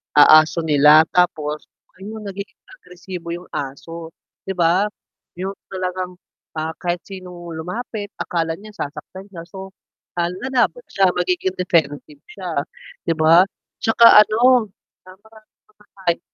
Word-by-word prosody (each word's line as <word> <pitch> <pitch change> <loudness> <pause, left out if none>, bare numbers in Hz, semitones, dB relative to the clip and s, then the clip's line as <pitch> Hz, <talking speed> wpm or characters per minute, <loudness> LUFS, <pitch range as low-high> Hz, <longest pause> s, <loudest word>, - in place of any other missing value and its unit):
ah, 155 +1 +9
aso 165 +2 -4
nila, 150 +1 +6
tapos 155 -4 0 0.4
ayun 215 +3 -8
nagiging 200 +1 -8 0.2
agresibo 180 -1 -9
yung 175 +1 -8
aso, 160 +4 -6 0.4
'di 190 - -2
ba. 175 +3 +3 0.5
Yung 195 +1 -4 0.2
talagang, 185 -1 -4 0.5
ah, 160 +1 -3
kahit 175 0 -2
sinong 180 -3 -9
lumapit 205 +4 -5
akala 165 -2 -1
niya 210 0 -13
sasaktan 185 +5 -7
siya 170 -3 -8
so, 190 0 -10 0.5
ah, 170 - +2
lalaban 260 - -1
siya 195 -1 +3
magiging 370 +1 -1
defensive 150 -5 -1
siya 185 -3 -7 0.6
'di 165 - +3
ba. 165 +4 +6 0.3
'Tsaka 225 -1 +7
ano 240 +2 +3 0.4
ah 185 - -13
maraming 220 0 -20 0.3
mga 195 - -21
hay 170 - +2
180 Hz, 130 wpm, -20 LUFS, 165-200 Hz, 0.6 s, ah